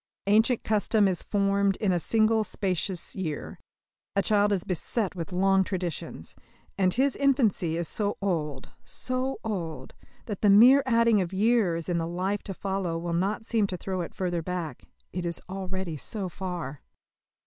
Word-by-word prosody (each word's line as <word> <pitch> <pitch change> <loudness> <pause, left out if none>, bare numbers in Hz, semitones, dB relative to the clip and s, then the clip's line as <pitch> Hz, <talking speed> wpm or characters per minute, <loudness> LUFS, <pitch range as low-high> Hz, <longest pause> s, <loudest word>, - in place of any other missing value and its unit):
Ancient 220 +4 +3
custom 215 -1 +2
is 185 -2 0
formed 200 -1 +1
in 200 -1 0
a 175 - +2
single 220 +3 +2
spacious 185 -3 -2
year. 165 -6 -4 0.6
A 200 - +3
child 205 +1 +3
is 190 -3 +1
beset 190 +3 -2
with 170 -2 -6
long 195 +1 +3
traditions. 180 -3 -5 0.4
And 185 -2 +2
his 265 +6 +2
infancy 230 - +2
is 170 -1 -1
so 205 +3 -2
old, 155 -8 -2
so 255 +1 -2
old, 175 -8 -4 0.3
that 210 -4 -5
the 210 - +4
mere 245 +8 +8
adding 230 -3 +4
of 180 0 -4
years 195 -5 +2
in 175 -2 0
the 165 - -2
life 185 +4 -2
to 195 - -4
follow 190 -4 -2
will 170 0 -3
not 195 +6 -1
seem 220 -3 +1
to 185 - -4
throw 185 0 -3
it 170 - -7
further 175 -2 -1
back 175 -2 -5 0.3
it 180 0 -3
is 170 -1 -1
already 190 -3 -4
so 195 - -4
far. 175 -6 -5
190 Hz, 165 wpm, -27 LUFS, 175-210 Hz, 0.6 s, mere